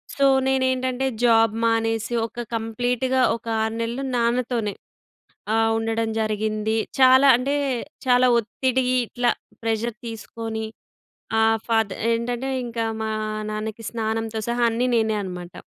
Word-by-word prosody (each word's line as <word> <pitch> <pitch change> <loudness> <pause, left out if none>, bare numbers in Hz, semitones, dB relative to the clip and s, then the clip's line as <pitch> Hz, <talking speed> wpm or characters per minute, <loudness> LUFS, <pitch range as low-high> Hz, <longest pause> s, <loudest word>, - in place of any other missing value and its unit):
So 280 - +3 0.2
నే‌నేంటంటే 260 0 +1 0.2
job 225 -2 +4
మానేసి 225 0 0
ఒక 240 +1 -7
కంప్లీట్‌గా 245 +3 0
ఒక 230 - -11 0.2
6 220 0 -2
నెలలు 240 +4 -3
నాన్నతోనే 235 -3 0 0.8
ఆహ్, 225 0 +3
ఉండడం 225 0 -1
జరిగింది. 215 0 -1 0.2
చాలా 260 +1 +7
అంటే, 270 +4 -1 0.5
చాలా 250 0 +5
ఒత్తిడి 255 +3 0 0.2
ఇట్ల 245 +2 -7 0.4
ప్రెషర్ 225 +1 -1
తీసుకొని 225 0 -5 0.8
ఆహ్, 225 0 +3
ఫాదర్ 225 -3 +1
ఏంటంటే 240 +3 -1 0.2
ఇంకా 230 -1 -3 0.2
మా 220 - -2 0.4
నాన్నకి 215 +1 -5
స్నానంతో 225 -1 -2
సహా 240 0 +1
అన్నీ 245 +2 0
నేనే 220 -1 +1
అనమాట. 180 -1 -7
230 Hz, 120 wpm, -23 LUFS, 220-245 Hz, 0.8 s, చాలా